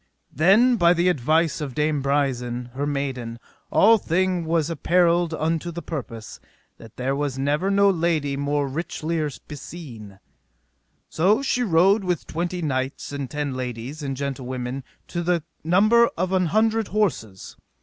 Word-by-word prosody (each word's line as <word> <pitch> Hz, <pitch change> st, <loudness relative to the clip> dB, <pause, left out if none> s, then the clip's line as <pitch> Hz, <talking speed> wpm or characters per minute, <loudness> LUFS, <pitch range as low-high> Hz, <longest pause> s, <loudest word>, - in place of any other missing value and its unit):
Then 215 Hz, -, +4 dB
by 175 Hz, -2 st, +4 dB
the 175 Hz, +1 st, +3 dB
advice 160 Hz, +1 st, +1 dB
of 135 Hz, -4 st, -5 dB
Dame 150 Hz, -1 st, 0 dB
Brisen, 125 Hz, -3 st, -1 dB
her 140 Hz, +2 st, -2 dB
maiden, 130 Hz, -5 st, -3 dB, 0.3 s
all 225 Hz, +2 st, +5 dB
thing 180 Hz, 0 st, 0 dB
was 160 Hz, -2 st, +1 dB
apparelled 170 Hz, +1 st, +2 dB
unto 160 Hz, +1 st, -1 dB
the 170 Hz, +1 st, -7 dB
purpose, 115 Hz, -8 st, -7 dB, 0.4 s
that 115 Hz, -2 st, -14 dB
there 130 Hz, +2 st, -1 dB
was 140 Hz, -2 st, -2 dB
never 145 Hz, +7 st, 0 dB
no 200 Hz, 0 st, +4 dB
lady 165 Hz, -6 st, +1 dB
more 140 Hz, 0 st, -1 dB
richlier 155 Hz, 0 st, -3 dB
beseen. 130 Hz, -, -9 dB, 0.9 s
So 200 Hz, +10 st, +2 dB
she 250 Hz, -2 st, 0 dB
rode 195 Hz, 0 st, +3 dB
with 180 Hz, -4 st, -1 dB
twenty 175 Hz, +1 st, -3 dB
knights, 130 Hz, -2 st, -2 dB
and 140 Hz, -2 st, -4 dB
ten 145 Hz, -2 st, -3 dB
ladies, 125 Hz, +3 st, -5 dB
and 135 Hz, -2 st, -4 dB
gentlewomen, 130 Hz, -1 st, -4 dB, 0.3 s
to 175 Hz, -, -3 dB
the 175 Hz, -2 st, 0 dB, 0.2 s
number 215 Hz, +8 st, +5 dB
of 185 Hz, +2 st, -1 dB
an 185 Hz, -2 st, +2 dB
hundred 220 Hz, +4 st, +1 dB
horses. 140 Hz, -, -2 dB
155 Hz, 145 wpm, -23 LUFS, 135-175 Hz, 0.9 s, all